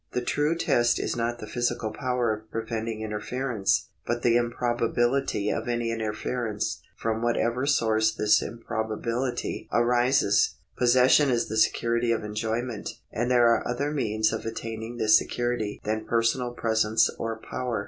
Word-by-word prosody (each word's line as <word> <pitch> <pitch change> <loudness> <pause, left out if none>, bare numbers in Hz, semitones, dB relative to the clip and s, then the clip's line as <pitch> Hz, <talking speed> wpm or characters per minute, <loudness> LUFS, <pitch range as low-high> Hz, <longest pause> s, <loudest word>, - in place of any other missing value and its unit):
The 125 - -1
true 150 +5 +1
test 120 -7 +2
is - - -2
not 120 0 -1
the 110 - -8
physical 120 -1 -2
power 125 -4 0
of 110 +1 -9
preventing 115 -1 -4
interference, 110 +1 -1 0.2
but 120 0 -1
the 120 -1 +4
improbability 120 -1 0
of - - -3
any 120 -1 -1
interference, 110 -4 -3 0.2
from 115 0 -2
whatever 120 +2 0
source 110 -5 +3
this 105 0 +3
improbability 115 +2 -3
arises. 120 -3 +3 0.2
Possession 130 +3 +5
is 120 -2 0
the 110 - -3
security 115 +1 +2
of 115 -2 0
enjoy 110 +2 -2
ment, 120 -4 -6
and 120 +2 -1
there 120 -1 +5
are 115 - +2
other 140 +4 -1
means 110 -6 0
of 110 - -3
attaining 115 +1 -5
this 110 -1 +5
security 120 -2 -1
than 110 +1 -2
personal 115 +2 +1
presence 110 -1 +2
or 115 0 -3
power. 125 0 -3
115 Hz, 150 wpm, -26 LUFS, 110-120 Hz, 0.2 s, Possession